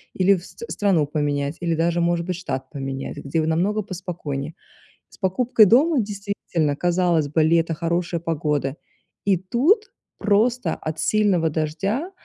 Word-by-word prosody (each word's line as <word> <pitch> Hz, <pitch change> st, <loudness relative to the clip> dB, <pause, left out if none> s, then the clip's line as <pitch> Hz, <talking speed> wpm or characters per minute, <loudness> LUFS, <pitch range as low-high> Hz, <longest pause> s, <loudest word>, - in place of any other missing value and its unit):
или 190 Hz, +1 st, +4 dB
в 175 Hz, -, -7 dB
с -, -, -15 dB
страну 190 Hz, -7 st, +2 dB
поменять, 145 Hz, 0 st, -1 dB
или 170 Hz, -1 st, 0 dB
даже, 170 Hz, +1 st, +1 dB
может 170 Hz, 0 st, +1 dB
быть, 180 Hz, -1 st, -3 dB
штат 135 Hz, -7 st, -5 dB
поменять, 135 Hz, -2 st, -5 dB
где 140 Hz, +3 st, -2 dB
в 155 Hz, -, -1 dB
намного 195 Hz, +7 st, +1 dB
поспокойнее. 165 Hz, -6 st, -5 dB, 0.5 s
С -, -, -18 dB
покупкой 225 Hz, +4 st, +4 dB
дома, 270 Hz, -, +4 dB
действительно, 200 Hz, -7 st, -2 dB
казалось 175 Hz, -2 st, +1 dB
бы- 160 Hz, +2 st, +2 dB
лето, 165 Hz, +1 st, +2 dB
хорошая 170 Hz, +1 st, -1 dB
погода, 150 Hz, -4 st, -1 dB, 0.5 s
и 195 Hz, -2 st, +3 dB
тут 275 Hz, -, +1 dB, 0.3 s
просто 230 Hz, +4 st, +2 dB
от 155 Hz, 0 st, -5 dB
сильного 190 Hz, -3 st, +2 dB
дождя, 170 Hz, -, -2 dB
170 Hz, 145 wpm, -23 LUFS, 155-200 Hz, 0.5 s, или